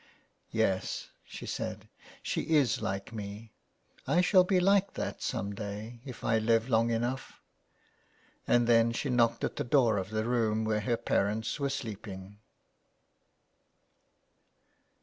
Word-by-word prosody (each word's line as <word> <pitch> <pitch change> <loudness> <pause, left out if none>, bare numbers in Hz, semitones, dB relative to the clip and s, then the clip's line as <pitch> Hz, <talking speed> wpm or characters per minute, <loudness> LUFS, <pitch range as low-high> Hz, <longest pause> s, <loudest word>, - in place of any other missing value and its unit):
" - - -45
Yes,'' 110 -4 -1
she - - -9
said, - - -4 0.2
*' - - -21
she - - -1
is 140 -6 +3
like 100 +3 -3
me, 105 +1 -7 0.5
I 175 - +4
shall 185 0 +5
be 185 0 +2
like 195 +2 +3
that - - -4
some 100 +1 -2
day 105 +3 -6
if 130 -3 -9
I 110 0 +2
live 115 +1 +2
long 115 0 +3
enough." 120 +3 -2 1.1
And 120 -1 +4
then 115 0 +4
she 135 +3 -2
knocked 115 -1 +2
at - - -2
the - - 0
door 120 -4 +3
of 95 0 -5
the 110 0 -1
room 110 -2 +1
where 110 -1 +1
her 120 +2 0
parents 105 +5 0
were 140 -1 0
sleeping. 105 -6 -6
115 Hz, 145 wpm, -30 LUFS, 105-125 Hz, 1.1 s, shall